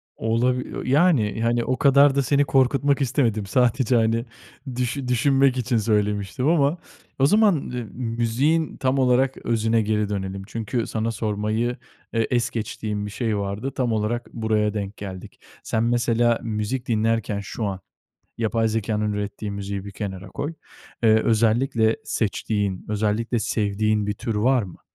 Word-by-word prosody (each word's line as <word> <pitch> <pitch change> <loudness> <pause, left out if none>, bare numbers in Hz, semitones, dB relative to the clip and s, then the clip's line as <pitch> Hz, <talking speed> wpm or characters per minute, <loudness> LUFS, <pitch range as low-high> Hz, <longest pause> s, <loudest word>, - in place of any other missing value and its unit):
Olabi 125 +3 0
ııı, - - -5
yani, 135 - +3
hani, 120 +1 +1
o 130 +2 -1
kadar 140 0 +5
da 140 - +3
seni 140 +2 +3
korkutmak 140 +1 +2
istemedim. 115 -5 +1
Sadece, 125 +3 +2
hani, 115 +1 +2 0.5
düşün 125 +2 -2
düşünmek 135 +1 +3
için 120 -1 0
söylemiştim 105 +3 0
ama 155 -1 +3 0.4
o 135 - +5
zaman, 210 +4 +5
ııı, 125 -4 -4
müziğin 125 +7 0
tam 130 +1 +1
olarak 130 +1 +2
özüne 115 0 +2
geri 105 -1 0
dönelim. 95 -1 -4
Çünkü 115 +1 -3
sana 110 +1 -2
sormayı, 110 +2 -1 0.4
eee, 115 -1 +1
es 120 -2 +1
geçtiğim 105 -2 -4
bir 105 - -6
şey 110 -1 -1
vardı, 100 +6 -3
tam 125 -3 -1
olarak 110 +3 -2
buraya 110 -2 0
denk 100 -1 -4
geldik. 95 -2 -8 0.2
Sen 110 - 0
mesela 120 0 +2
müzik 110 +3 -3
dinlerken 115 -2 0
şu 100 +3 -5
an, 95 -2 -3 0.6
yapay 115 0 +1
zekânın 105 -1 -1
ürettiği 105 0 -4
müziği 100 0 -5
bir 100 - -7
kenara 100 -2 -6
koy. 145 - -4 0.5
Eee, 115 - +6
özellikle 115 +1 +2
seçtiğin, 105 -3 -2
özellikle 110 +3 0
sevdiğin 105 0 0
bir 105 - 0
tür 115 +1 -4
var 125 +3 +3
mı? 90 -3 -11
115 Hz, 150 wpm, -23 LUFS, 105-125 Hz, 0.6 s, Eee